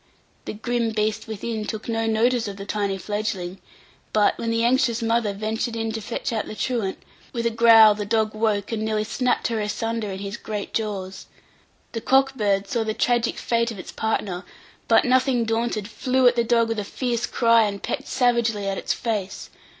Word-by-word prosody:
The - - -4
grim 235 +2 -1
beast 215 0 -1
within 220 0 -4
took 215 0 -5
no 225 -1 0
notice 230 +1 +2
of 200 -1 -6
the 195 - -7
tiny 200 -1 -1
fledgling; 195 -3 -3 0.5
but, 210 -1 +3
when 230 - -2
the 230 0 +1
anxious 240 -1 +2
mother 225 -2 +1
ventured 220 +3 -3
in 225 0 -2
to 220 0 -4
fetch 230 +2 -3
out 220 - -2
the - - -7
truant, 225 -5 -1 0.4
with 235 -1 -2
a 230 - +2
growl 225 -1 +7
the 205 0 -4
dog 215 +1 0
woke, 215 -2 0
and 225 -2 -2
nearly 215 -1 0
snapped 245 +3 0
her 225 -2 -1
asunder 220 +1 -2
in 190 - -5
his 200 +2 -5
great 210 -3 -5
jaws. 195 -4 -4 0.6
The 225 - -4
cock 270 +2 +3
bird 200 -5 0
saw 230 +2 0
the 220 0 -2
tragic 240 -1 +1
fate 235 0 0
of 225 - -7
its 185 - -8
partner; 200 -4 -2 0.4
but, - - +5
nothing 255 -1 +3
daunted, 225 -2 -1
flew 255 +3 +2
at 245 - +4
the 235 - +2
dog 230 0 +2
with 225 -1 -1
a - - -2
fierce 240 +3 -2
cry, 230 -2 +4
and 200 -1 -4
pecked - - -3
savagely 235 -5 +1
at 195 0 -1
its - - -1
face. 210 -5 -4
225 Hz, 195 wpm, -23 LUFS, 210-235 Hz, 0.6 s, growl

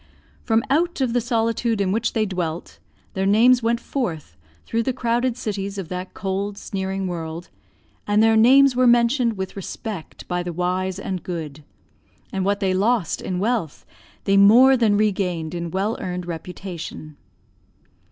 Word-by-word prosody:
From 225 -1 +1
out 340 +4 +1
of 255 -3 0
the 245 - +2
solitude 230 -1 0
in 195 -2 +1
which 225 +3 0
they 220 -1 +1
dwelt, 175 -4 -4 0.3
their 190 0 -1
names 240 +5 +5
went 230 +1 +1
forth 180 - -4 0.3
through 230 - -1
the 255 +3 -1
crowded 240 0 0
cities 200 -4 -4
of 185 -4 -5
that 180 +1 -6
cold, 200 +1 -3
sneering 195 -1 -3
world, 170 -1 -5 0.6
and 210 +1 +3
their 225 0 +4
names 260 +4 +6
were 255 0 +4
mentioned 240 0 +3
with 190 0 -5
respect 200 -2 -7
by 180 0 -1
the 175 -1 -5
wise 180 +2 -1
and 190 -2 -4
good; 155 -4 -6 0.7
and 190 - -1
what 200 +1 0
they 190 -1 +1
lost 205 -1 +1
in 185 - -3
wealth, 205 - -2 0.4
they 195 0 +2
more 240 +7 +7
than 220 -5 +3
regained 180 -6 -1
in 170 -1 -4
well 195 +6 -1
earned 180 -1 -4
reputation. 170 -2 -7
200 Hz, 160 wpm, -22 LUFS, 180-230 Hz, 0.7 s, more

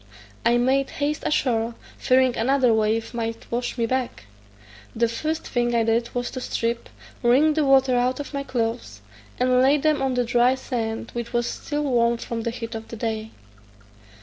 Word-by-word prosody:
I 235 +1 +4
made 265 +3 +2
haste 290 +1 -1
ashore, 235 -5 0 0.2
fearing 255 -1 +3
another 255 0 +3
wave 220 +1 0
might 230 -1 -4
wash 240 +2 -2
me 230 - +1
back. 240 - -2 0.7
The 235 +1 +2
first 315 +7 -3
thing 240 -1 0
I 230 - +3
did 230 +1 +1
was 245 0 -2
to 255 - -5
strip, 235 -1 -2 0.3
wring 270 +6 +4
the 310 0 +1
water 270 -2 +4
out 250 +2 +1
of 290 - -6
my 280 - -2
clothes, 230 - -3 0.4
and 250 0 +3
lay 275 +3 +5
them 300 0 +1
on 265 -1 0
the 245 - +2
dry 245 +2 +3
sand, 230 -3 -4
which 235 0 -5
was 240 0 +1
still 295 +4 -3
warm 235 -4 +2
from 230 0 -4
the 235 - -2
heat 230 0 -6
of 225 0 -6
the - - -8
day. 220 -1 -3
240 Hz, 180 wpm, -24 LUFS, 230-260 Hz, 0.7 s, lay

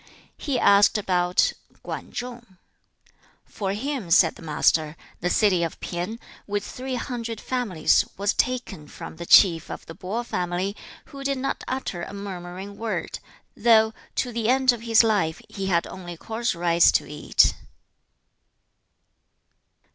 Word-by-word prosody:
3. - - -23 0.3
He 275 -5 -1
asked 200 +1 +5
about 180 -3 +2 0.3
Kwan - - -6
Chung. 240 -5 -7 0.9
'For 195 -2 -3
him,' 250 -3 -4
said 165 0 +5
the - - -15
Master, 155 0 +1 0.2
'the 180 - -1
city 190 -3 +3
of 165 - -4
Pien, 180 +6 -4 0.3
with 205 0 -2
three 260 0 -5
hundred 235 -3 -4
families, 230 -11 +1
was 200 +2 +1
taken 245 -11 -2
from 160 - -10
the 170 0 -7
chief 170 -4 +6
of - - -7
the 165 - -9
Po 200 +7 -4
family, 180 -1 -2 0.4
who 275 0 -7
did 275 0 0
not 270 +1 -3
utter 255 -9 -3
a 195 - -7
murmuring 190 0 -7
word, 225 -1 -3 0.4
though, 220 0 +4 0.2
to 250 - -1
the 230 -1 -1
end 260 0 +5
of 240 -2 -5
his 230 -1 +5
life, 200 -8 +1
he 195 -2 -4
had 170 -3 +2
only 175 -2 -8
coarse 225 +3 -2
rice 170 0 +4
to - - +2
eat.' - - +3
200 Hz, 145 wpm, -24 LUFS, 175-235 Hz, 0.9 s, chief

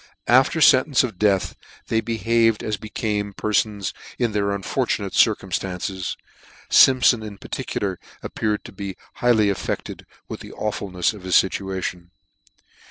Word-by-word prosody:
After 130 +7 +4
fentence 135 -1 +5
of 110 -8 -5
death 100 -3 +1 0.3
they 115 - +2
behaved 115 -1 +1
as 110 - -1
became 105 -1 -3
perfons 105 -2 -1 0.2
in 120 -3 0
their 100 -1 0
unfortunate 100 -1 -2
circumflances: 95 0 0 0.5
Simp 130 -1 +6
ion 115 - -6
in 105 -2 -8
particular 95 -1 -4 0.2
appeared 105 -1 -2
to - - -9
be 95 -1 -7 0.2
highly 110 -5 +4
affected 100 - -5 0.2
with - - -7
the - - -11
awfulnefs 100 -3 -2
of 105 - -11
his 90 0 0
fituation. 95 -2 0
105 Hz, 130 wpm, -22 LUFS, 95-115 Hz, 0.5 s, Simp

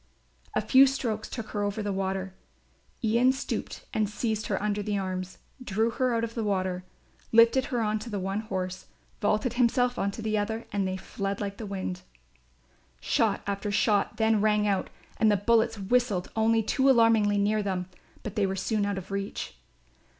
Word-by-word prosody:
A - - +2
few 270 +1 +6
strokes 230 -5 -2
took 230 -4 -6
her 205 - -2
over 205 +1 -1
the 205 -1 -1
water; 190 0 -2 0.7
Ian 235 +4 +4
stooped 265 +1 -4
and 215 -2 +1
seized 215 0 -2
her 195 - 0
under 210 0 -1
the 205 0 -1
arms, 185 -1 -4 0.3
drew 220 +1 0
her 250 0 0
out 230 - 0
of 230 0 -3
the 230 - -2
water, 185 -3 -1 0.5
lifted 230 +3 +5
her 245 -5 -1
on 215 0 0
to 235 - -7
the 205 - -3
one 195 +2 -2
horse, 185 -3 -4 0.3
vaulted 215 +3 +1
himself 245 0 +2
on 200 - +1
to 215 +3 -7
the 215 -1 +1
other 220 +2 -3
and 200 -1 0
they 185 0 -2
fled 195 +1 -4
like 200 -1 -4
the 220 - -6
wind. 185 -2 -4 1.0
Shot - - +1
after 200 +1 -2
shot 205 0 +2
then 220 -2 +3
rang 210 -1 +3
out 200 -2 0 0.3
and 220 -1 +4
the 205 - +3
bullets 225 +2 +2
whistled 205 -2 0
only 225 0 +3
too 265 +5 +2
alarmingly 225 -4 +4
near 210 +1 +2
them, 190 -3 -2 0.4
but 215 - -6
they 205 -2 +2
were 190 - -2
soon 205 +1 0
out 200 -1 -2
of 190 +1 -7
reach. 195 0 -4
210 Hz, 185 wpm, -28 LUFS, 195-225 Hz, 1.0 s, few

